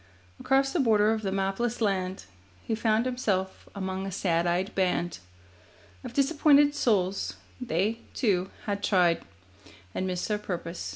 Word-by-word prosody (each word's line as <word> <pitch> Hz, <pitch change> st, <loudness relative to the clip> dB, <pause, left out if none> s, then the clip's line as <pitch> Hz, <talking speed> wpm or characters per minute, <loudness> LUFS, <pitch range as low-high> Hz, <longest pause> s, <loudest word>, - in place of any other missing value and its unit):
Across 270 Hz, +1 st, +2 dB
the 350 Hz, -, +1 dB
border 215 Hz, -5 st, +4 dB
of 220 Hz, -, -2 dB
the 195 Hz, -2 st, -2 dB
mapless 195 Hz, +5 st, -1 dB
land 190 Hz, -4 st, -1 dB, 0.4 s
He -, -, -2 dB
found 220 Hz, +1 st, +1 dB
himself 205 Hz, -7 st, -2 dB
among 190 Hz, -1 st, -3 dB
a -, -, -4 dB
sad 175 Hz, -2 st, +1 dB
eyed 180 Hz, +3 st, 0 dB
band 180 Hz, -2 st, 0 dB, 0.8 s
Of -, -, -7 dB
disappointed 290 Hz, +1 st, +4 dB
souls; 200 Hz, -9 st, 0 dB, 0.3 s
they, 220 Hz, 0 st, 0 dB, 0.2 s
too, 190 Hz, -6 st, +1 dB, 0.2 s
had 200 Hz, -1 st, -2 dB
tried 180 Hz, -5 st, +3 dB, 0.7 s
And 185 Hz, -, -2 dB
missed 180 Hz, -1 st, -2 dB
their 210 Hz, -1 st, -1 dB
purpose. 175 Hz, -3 st, -5 dB
200 Hz, 140 wpm, -28 LUFS, 185-235 Hz, 0.8 s, border